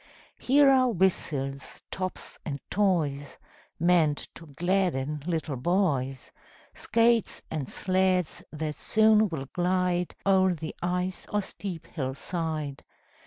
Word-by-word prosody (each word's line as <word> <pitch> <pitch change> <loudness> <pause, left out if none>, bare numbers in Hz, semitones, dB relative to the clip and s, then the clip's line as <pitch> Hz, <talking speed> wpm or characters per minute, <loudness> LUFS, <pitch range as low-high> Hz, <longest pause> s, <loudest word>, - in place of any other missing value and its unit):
Here 280 +2 +5
are 260 -2 +5
whistles, 145 - -1
tops 185 -1 -5
and 140 -3 -4
toys, 155 -9 0 0.4
Meant 165 -4 +2
to 165 - -12
gladden 150 -3 0
little 160 -5 -2
boys; 135 - 0 0.4
Skates 230 -1 +1
and 150 -5 -3
sleds 185 -2 0
that 155 0 -3
soon 220 -1 +4
will 150 -5 -4
glide 180 0 0
O'er 190 -2 +4
the 160 0 -6
ice 180 +1 -2
or 210 -1 +1
steep 185 -4 -7
hill 130 -5 -4
side. 155 -4 -4
175 Hz, 115 wpm, -27 LUFS, 150-190 Hz, 0.4 s, Here